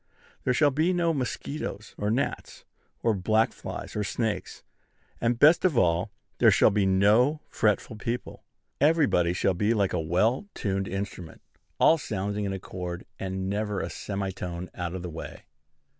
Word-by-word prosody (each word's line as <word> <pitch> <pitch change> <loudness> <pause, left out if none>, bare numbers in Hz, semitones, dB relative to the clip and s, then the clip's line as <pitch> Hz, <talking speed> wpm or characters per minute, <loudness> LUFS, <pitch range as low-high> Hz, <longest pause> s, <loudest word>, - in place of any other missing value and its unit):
There 125 - +3
shall 145 +1 +4
be 160 +6 +2
no 170 -2 +2
mosquitoes, 130 -5 -4
or 105 - -2
gnats, 130 +6 -2 0.4
or 115 - +3
black 110 +3 +2
flies, - - -7
or 105 - 0
snakes; 110 +2 -3 0.6
and, 115 0 +1
best 155 +7 +6
of 175 -9 +2
all, 85 -4 +2 0.3
there - - +7
shall - - +5
be 100 -1 +2
no 110 +10 +4
fretful 105 +1 0
people. 115 +3 -4 0.4
Everybody 145 - +3
shall 95 +2 +1
be 105 +6 +1
like 100 -3 +1
a 90 - +1
well 105 - +1
tuned 95 -2 -1
instrument, 95 -3 -6 0.4
all 160 - +5
sounding 105 -3 -3
in 100 - -2
accord, 90 -2 -6
and 95 0 -3
never 105 0 -1
a - - -4
semitone 95 -3 -5
out 90 0 -4
of 90 - -5
the 90 - -4
way. 80 - -8
105 Hz, 160 wpm, -27 LUFS, 95-125 Hz, 0.6 s, there